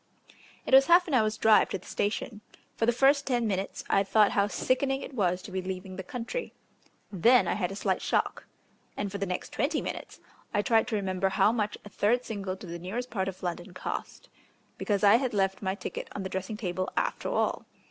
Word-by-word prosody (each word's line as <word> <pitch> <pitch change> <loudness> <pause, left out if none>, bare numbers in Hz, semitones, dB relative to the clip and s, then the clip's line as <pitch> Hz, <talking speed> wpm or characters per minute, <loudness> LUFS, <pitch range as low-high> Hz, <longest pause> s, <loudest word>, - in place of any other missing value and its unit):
It - - -3
was 270 0 +8
half 350 +1 +6
an 310 - -3
hour's 215 -4 +2
drive 220 -1 +5
to - - -2
the 185 - -18
station. 210 +1 -2 0.3
For 225 - 0
the - - +6
first 275 +3 +3
five 245 -3 +1
minutes 195 -3 -2
I 195 - +3
thought 210 +1 +4
how 200 0 +2
sickening 270 +5 0
it - - -8
was 185 -5 0
to - - -9
be 190 0 -2
leaving 185 0 -6
the 190 - -5
country; 245 - -5 0.6
then 235 +6 +4
I - - +1
had 185 -3 -2
a - - -6
slight - - -1
shock; - - -1 0.5
and 205 -1 -2
for 200 - -5
the 200 - -2
next 180 - -4
twenty 285 +7 0
five - - -3
minutes - - -6 0.4
I 205 - +2
tried 225 -2 +3
to 235 - -1
remember 190 -1 0
how 195 +2 +3
much 210 -3 -1
a - - -9
third 235 +5 +1
single 195 -3 -4
to 195 - -10
the 170 0 -6
nearest 230 +8 -5
part 190 -3 -1
of 190 -1 -6
London 175 0 -4
cost. - - -5 0.5
Because 205 -1 0
I 205 +2 +7
had 255 -3 -2
left 195 -1 +1
my 190 -1 -1
ticket - - -6
on 200 - -3
the 190 - -4
dressing 190 +3 -4
table 185 -2 -2
after - - -1
all. - - -1
205 Hz, 220 wpm, -28 LUFS, 190-240 Hz, 0.6 s, was